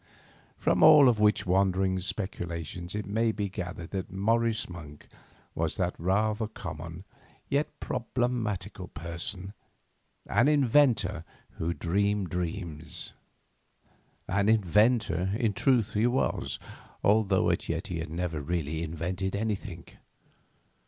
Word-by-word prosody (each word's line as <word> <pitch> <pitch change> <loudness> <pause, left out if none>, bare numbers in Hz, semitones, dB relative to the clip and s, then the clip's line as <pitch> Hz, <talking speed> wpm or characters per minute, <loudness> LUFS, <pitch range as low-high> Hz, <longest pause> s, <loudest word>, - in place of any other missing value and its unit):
From - - +1
all 150 -3 +9
of 115 -4 +3
which 105 -1 +3
wandering 95 0 +2
speculations 90 -3 -4
it 105 - -3
may 110 +3 +1
be 105 -2 -3
gathered 90 -3 -6
that 95 -2 -3
Morris 115 +3 +1
Monk 80 -5 -10 0.5
was - - -1
that - - 0
rather 105 +5 +1
common 80 -4 -7 0.5
yet 145 +2 -1
problematical 110 -6 -2
person, 85 +4 -5 0.7
an 120 - +3
inventor 130 - +3 0.4
who 85 +1 -1
dreamed 100 +1 0
dreams. 85 -3 -3 1.1
An 100 +3 +2
inventor, 105 -2 +3
in 115 -4 +1
truth, 120 -2 +2
he 105 +3 +3
was, 125 +2 0 0.5
although 100 -2 +3
as - - -1
yet - - -2
he 85 -2 -4
had 80 -1 -4
never 85 -1 -3
really 80 0 -2
invented 90 +4 -3
anything. 100 -5 -3
95 Hz, 115 wpm, -29 LUFS, 85-110 Hz, 1.1 s, all